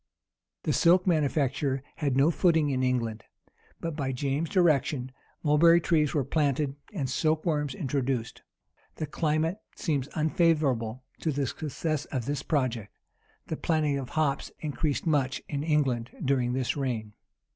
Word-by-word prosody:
The - - +1
silk 180 +1 +4
manufacture 140 -5 +1
had 140 -4 0
no 145 +5 +5
footing 160 -4 +3
in 130 -1 0
England: 120 -4 0 0.6
but, 165 -2 -4
by 135 -4 -2
James's 140 +4 -1
direction, 145 -7 +2 0.3
mulberry 165 +3 +6
trees 155 -3 +1
were 145 - +2
planted, 140 0 0 0.2
and 155 -11 -2
silk 155 +5 0
worms 150 -5 0
introduced.[] 130 -3 -2 0.5
The 155 - -3
climate 155 +4 0 0.2
seems 145 -6 -1
unfavorable 150 -7 +1 0.2
to 160 - 0
the 140 -1 0
success 155 +2 -3
of 130 -5 -3
this 145 +2 -2
project. 125 -8 -1 0.5
The 160 - -4
planting 150 -4 +1
of 130 - -6
hops 150 -3 +1
increased 150 0 -2
much 140 -5 +1
in 140 -1 -3
England 135 -7 +1 0.2
during 130 -2 +1
this 130 -1 0
reign. 120 -7 -3
145 Hz, 140 wpm, -28 LUFS, 130-155 Hz, 0.6 s, mulberry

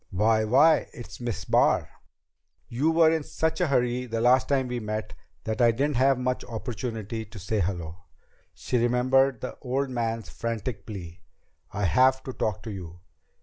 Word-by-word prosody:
"Why 110 +3 +2
why, 145 +8 +4
it's 120 - -10
Miss 105 -7 -4
Barr." - - +3 0.8
"You 135 +7 0
were 165 -1 +5
in 160 -1 +1
such 160 +3 -2
a 175 - +3
hurry 125 -2 0
the 115 -1 -2
last 125 +2 +4
time 135 -2 +1
we 125 -1 -3
met 110 -1 -4 0.3
that 110 +2 -2
I 120 - +6
didn't 135 +4 0
have 135 +1 +4
much 125 0 -2
opportunity 115 -2 -5
to 110 0 -13
say 100 +3 -2
hello." 85 -3 -3 0.6
She 125 - -1
remembered 125 +2 +2
the 130 - -6
old 135 +1 -1
man's 115 -2 -2
frantic 115 -2 -5
plea: 90 -5 -8 0.5
"I 105 - -3
have 130 +7 +3
to 130 - -6
talk 105 -3 -2
to 110 - -6
you!" 90 -3 -9
120 Hz, 170 wpm, -26 LUFS, 110-130 Hz, 0.8 s, I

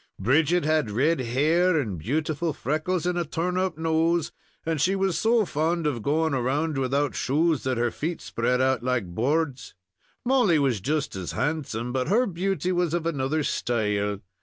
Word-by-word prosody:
"Bridget 155 - +2
had 155 -6 +1
red 140 +9 +1
hair 155 +8 +2
and 105 - -3
beautiful 155 - -1
freckles 155 +7 -2
and 180 0 0
a - - +1
turn 170 +3 -2
up 185 -3 -1
nose, 160 0 +1 0.3
and 160 -3 -1
she 190 +5 +2
was 195 -2 0
so 225 -1 +3
fond 165 +1 -1
of 135 -6 -1
going 155 +4 +1
round 135 +4 0
without 135 +2 0
shoes 155 +3 +1
that 130 -2 0
her 120 0 +1
feet 165 +2 -3
spread 125 +2 -1
out 130 -2 +2
like 125 -4 0
boards; 140 - -1 0.5
Molly 240 -10 +4
was 130 -8 +1
just 145 +4 -1
as 95 -2 -5
handsome, 130 -5 -2
but 130 -1 -1
her 225 +8 +3
beauty 185 -1 -1
was 175 -2 0
of 170 -2 -2
another 150 -1 0
style. 105 -6 -1
155 Hz, 170 wpm, -25 LUFS, 130-170 Hz, 0.5 s, Molly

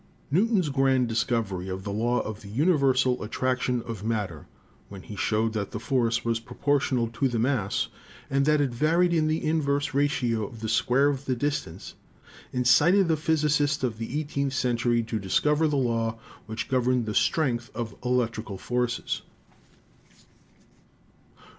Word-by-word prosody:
Newton's 190 0 +2
grand 135 -2 +2
discovery 110 -5 -1
of 95 0 -5
the 100 - -4
law 120 +4 +1
of 110 0 -6
the 100 - -11
universal 135 - +2
attraction 125 +2 -1
of 110 -4 -6
matter, 105 -9 -3 0.4
when 100 -2 -10
he 105 - -9
showed 110 +2 0
that 105 -2 -2
the 105 - -5
force 115 -1 0
was 115 -1 +1
proportional 125 0 0
to 130 +4 0
the 120 -2 -2
mass 115 -4 0 0.4
and 140 +1 +1
that 150 -1 +4
it 140 -3 0
varied 165 +8 +2
in 155 -2 +2
the 155 +1 -1
inverse 145 -3 0
ratio 130 -5 +1
of 115 - -12
the 110 - -3
square 125 +5 +3
of 140 -1 -3
the 130 - 0
distance, 145 - -3 0.6
incited 150 +10 +4
the 160 - +4
physicists 150 -2 +1
of 115 -3 -1
the 120 +6 -3
eighteenth 140 -3 -2
century 120 -2 +1
to 110 -1 -3
discover 150 +11 +2
the 150 -2 0
law 115 -3 0 0.3
which 110 +1 -4
gov 130 -2 +1
erned 125 -2 +2
the 105 - -3
strength 120 -3 +1
of 115 -2 -4
electrical 115 -5 -1
forces. 125 +4 -2
125 Hz, 155 wpm, -26 LUFS, 115-145 Hz, 0.6 s, that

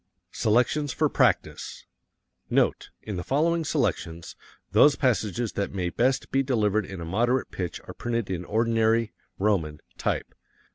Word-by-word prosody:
Selections 125 +6 +2
for - - +1
Practise - - 0 0.6
Note: - - +1
In 105 -4 -5
the 90 - -3
following 165 - +1
selections, 85 - -2 0.4
those 140 +8 +6
passages 120 - 0
that 100 0 -3
may 90 -2 -1
best 130 +6 0
be 135 - +3
delivered 110 -6 +1
in 95 -2 -7
a - - -5
moderate 120 +9 0
pitch 90 -3 -4
are - - -7
printed 115 -3 -2
in 90 -2 -3
ordinary 115 +2 +1 0.2
(roman) 85 -7 0 0.2
type. - - -2
110 Hz, 140 wpm, -26 LUFS, 95-125 Hz, 0.6 s, those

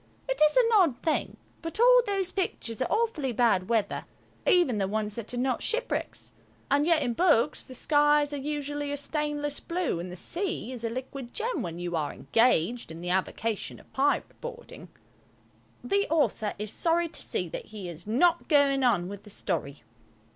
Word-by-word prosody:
It - - -2
is 305 +7 +4
an 485 -2 +5
odd 345 - +4
thing, 320 -2 0 0.2
but 330 +5 -6
all - - +7
those 390 -2 0
pictures 250 - -3
are 255 - -1
awfully 435 - 0
bad 220 -6 +2
weather–even 235 - 0
the 195 - +1
ones 210 +1 -2
that 230 0 -6
are 245 - -4
not 255 0 0
shipwrecks. 485 +2 -2 0.4
And 285 +2 +3
yet 330 -3 +4
in 245 -2 0
books 300 -5 +3
the 255 - -10
skies 295 +1 +3
are - - -2
usually 290 0 -3
a 285 - -2
stainless 295 0 -2
blue 340 - -2
and 175 +1 -6
the - - -7
sea 340 - -3
is 245 -3 -6
a 230 - 0
liquid 255 +1 -7
gem 455 - -1
when 170 -4 -5
you 175 0 -3
are 150 -3 -1
engaged 230 -3 +1
in 165 +1 -8
the 180 0 -2
avocation 205 +3 -2
of - - -21
pirate 280 +2 0
boarding. 485 0 -9 0.9
The 400 +1 +1
author 290 -9 +1
is 210 0 -3
sorry 340 0 +2
to 330 - -5
see - - -1
that - - -6
he 205 -4 -8
is 175 +2 -9
not 335 +10 +3
going 280 -3 +4
on 195 -8 +2
with 200 +1 -7
the 210 - -14
story. 150 - -3
275 Hz, 185 wpm, -28 LUFS, 215-335 Hz, 0.9 s, all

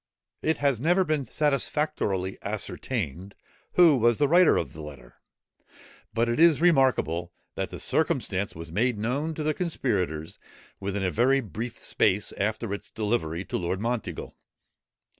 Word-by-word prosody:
It 160 - +1
has 140 -5 +1
never 175 +5 +3
been 155 -5 -1
satisfactorily 135 -9 0
ascertained 100 - -4 0.4
who 170 -5 +6
was 120 -1 +3
the 145 - +3
writer 175 +3 +5
of 70 -7 -3
the 80 - -9
letter; 70 -5 -11 0.9
but 115 +1 +1
it 120 +3 -1
is 165 -3 +6
remarkable 130 - +2 0.2
that - - -3
the - - -8
circumstance 95 +2 0
was 85 0 -8
made 115 +5 +1
known 140 +9 -2
to 155 - -3
the 155 0 +1
conspirators 100 - -2 0.4
within 100 0 -3
a 90 - +1
very 130 +6 +3
brief 115 - -6
space 100 +3 +1
after 110 +1 -2
its 100 - -6
delivery 100 -6 -2
to - - -3
Lord 90 +1 -2
Monteagle. 115 +1 -3
115 Hz, 145 wpm, -27 LUFS, 95-140 Hz, 0.9 s, who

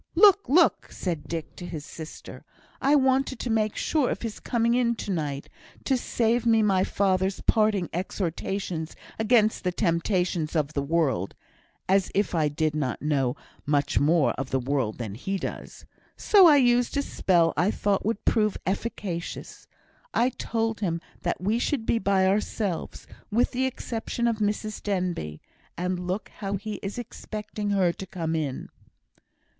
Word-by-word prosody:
"Look! 405 - +6
look!" 335 +5 +4
said 170 -6 -4
Dick 165 -3 -5
to 175 - -7
his 155 -4 -6
sister. 160 -1 -9 0.4
"I 280 +2 +4
wanted 265 -1 +2
to 235 - -3
make 215 -1 +1
sure 300 -5 +1
of - - -3
his 225 -2 -4
coming 235 -1 +1
in 240 -1 +2
to 205 - -4
night, 145 -5 -3 0.4
to 270 - +2
save 235 -1 +1
me 225 -2 +4
my 190 -3 +3
father's 190 -1 +1
parting 215 -5 +2
exhortations 175 -1 -3 0.2
against 220 -1 +3
the 180 - +1
temptations 170 -1 0
of 150 -2 0
the 140 - 0
world 140 - 0 0.5
(as 195 0 +3
if 205 +1 +1
I 160 -3 +2
did 155 +1 0
not 145 -3 -2
know 135 -4 +1 0.3
much 145 0 +1
more 155 +1 +3
of 135 -1 -3
the 135 - +1
world 130 -4 -1
than 110 -5 -5
he 190 - -3
does!), - - -7 0.3
so 390 -4 +7
I 300 -3 +7
used 245 0 +3
a 280 - +2
spell 170 -9 +2
I 175 +6 +2
thought 205 -2 0
would 215 0 -2
prove 215 -3 +2
efficacious; 190 -3 -4 0.5
I 245 - +4
told 225 -2 -2
him 170 -5 -1 0.2
that - - -1
we 210 +5 +1
should 245 -2 -1
be 230 - +2
by 190 -1 +2
ourselves, 195 -2 -1 0.2
with 230 +4 +2
the 260 +1 +1
exception 235 -1 -3
of 230 -2 +1
Mrs 215 0 -2
Denbigh, 180 - -2 0.4
and 180 0 -2
look 185 +4 -3
how 200 -1 -2
he 210 +2 -4
is 195 +3 -5
expecting 215 -3 -5
her 190 -4 +2
to 190 - -8
come 165 -3 -3
in!" 145 -5 -3
195 Hz, 160 wpm, -26 LUFS, 165-225 Hz, 0.5 s, so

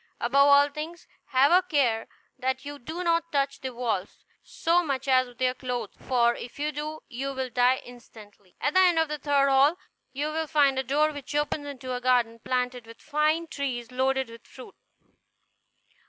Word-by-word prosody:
Above 280 0 +4
all 285 0 +6
things, 310 +4 -7 0.2
have 265 +3 +3
a 360 +1 +6
care 250 -10 0 0.3
that 260 +1 -2
you 290 0 -7
do 320 +8 -6
not 335 -1 +1
touch 275 -1 -1
the 260 - -4
walls, 230 -6 -4 0.2
so 345 +2 +1
much 275 -3 -3
as 255 -1 +4
with 245 0 -17
your 255 -1 +2
clothes; 245 -4 -4
for 240 -2 +2
if 240 - -9
you 300 +1 -1
do, 305 +1 -5
you 270 +2 -4
will 260 -1 -3
die 250 +2 +4
instantly. 215 -5 -15
At 290 - 0
the 375 - +5
end 360 -3 +5
of 320 -1 +2
the 300 0 -4
third 280 -1 +2
hall, 275 +5 +4 0.3
you 290 +3 -2
will 320 0 -2
find 285 -4 +3
a - - -1
door 295 +4 +2
which 290 -1 -8
opens 295 0 -1
into 260 -2 -6
a 250 - -3
garden, 240 -2 +2
planted 250 -1 -2
with 230 0 -13
fine 310 +2 0
trees 255 -6 -4
loaded 260 -1 0
with 230 - -14
fruit. 255 - -12
270 Hz, 190 wpm, -27 LUFS, 250-300 Hz, 0.3 s, all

